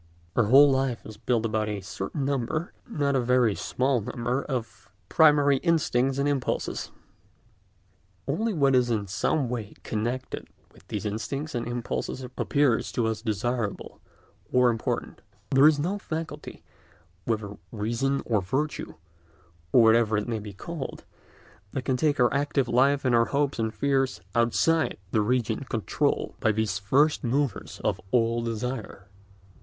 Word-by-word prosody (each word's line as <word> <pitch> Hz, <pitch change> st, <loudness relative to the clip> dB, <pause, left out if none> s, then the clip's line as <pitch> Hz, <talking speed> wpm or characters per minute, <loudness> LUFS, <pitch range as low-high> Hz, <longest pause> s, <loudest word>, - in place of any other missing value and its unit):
Our 115 Hz, -, +3 dB
whole 140 Hz, +6 st, +7 dB
life 130 Hz, -3 st, -1 dB
is 110 Hz, -1 st, -10 dB
built 115 Hz, +1 st, 0 dB
about 110 Hz, -1 st, 0 dB
a 105 Hz, -1 st, -3 dB
certain 95 Hz, +8 st, -4 dB
number—not 140 Hz, -, -2 dB
a -, -, +3 dB
very 125 Hz, -3 st, +3 dB
small 130 Hz, +3 st, 0 dB
number—of 120 Hz, 0 st, -3 dB, 0.2 s
primary 145 Hz, -3 st, +5 dB
instincts 135 Hz, -5 st, +1 dB
and 140 Hz, +1 st, +1 dB
impulses. 140 Hz, -3 st, -2 dB, 1.4 s
Only 215 Hz, +11 st, 0 dB
what 140 Hz, -7 st, +2 dB
is 125 Hz, -1 st, +3 dB
in 110 Hz, -3 st, 0 dB
some 100 Hz, +9 st, 0 dB
way 115 Hz, -4 st, -5 dB
connected 120 Hz, +4 st, -3 dB, 0.3 s
with -, -, -20 dB
these -, -, -4 dB
instincts 115 Hz, +9 st, -3 dB
and 120 Hz, -2 st, -2 dB
impulses 120 Hz, +2 st, -3 dB
appears 140 Hz, -6 st, +1 dB
to 120 Hz, -, 0 dB
us 110 Hz, -1 st, -1 dB
desirable 115 Hz, 0 st, -3 dB, 0.5 s
or 125 Hz, -1 st, +5 dB
important; 115 Hz, -1 st, -3 dB, 0.3 s
there 135 Hz, +2 st, +7 dB
is 155 Hz, -1 st, +4 dB
no 180 Hz, +8 st, -1 dB
faculty, 155 Hz, -4 st, -6 dB, 0.6 s
whether 105 Hz, -3 st, -2 dB
"reason" 120 Hz, +6 st, -1 dB
or 110 Hz, -4 st, +1 dB
"virtue" 135 Hz, +11 st, -3 dB, 0.8 s
or 120 Hz, -, +6 dB
whatever 110 Hz, -1 st, +4 dB
it 105 Hz, -, -2 dB
may 115 Hz, -2 st, -2 dB
be 105 Hz, 0 st, -8 dB
called, 140 Hz, -, -7 dB, 0.7 s
that 130 Hz, -, -3 dB
can 130 Hz, -, +1 dB
take 145 Hz, +2 st, +1 dB
our 120 Hz, -1 st, +4 dB
active 140 Hz, -2 st, +1 dB
life 135 Hz, +4 st, +3 dB
and 125 Hz, -, +3 dB
our 115 Hz, 0 st, +5 dB
hopes 140 Hz, 0 st, 0 dB
and 110 Hz, -1 st, 0 dB
fears 135 Hz, +1 st, 0 dB
outside 140 Hz, +8 st, +2 dB
the 110 Hz, -, +2 dB
region 120 Hz, +1 st, 0 dB
controlled -, -, -1 dB
by 110 Hz, -, +3 dB
these 105 Hz, -2 st, -1 dB
first 140 Hz, +11 st, +2 dB
movers 135 Hz, +2 st, -1 dB
of -, -, 0 dB
all 115 Hz, +1 st, +2 dB
desire. 115 Hz, -3 st, -4 dB
125 Hz, 145 wpm, -26 LUFS, 110-140 Hz, 1.4 s, whole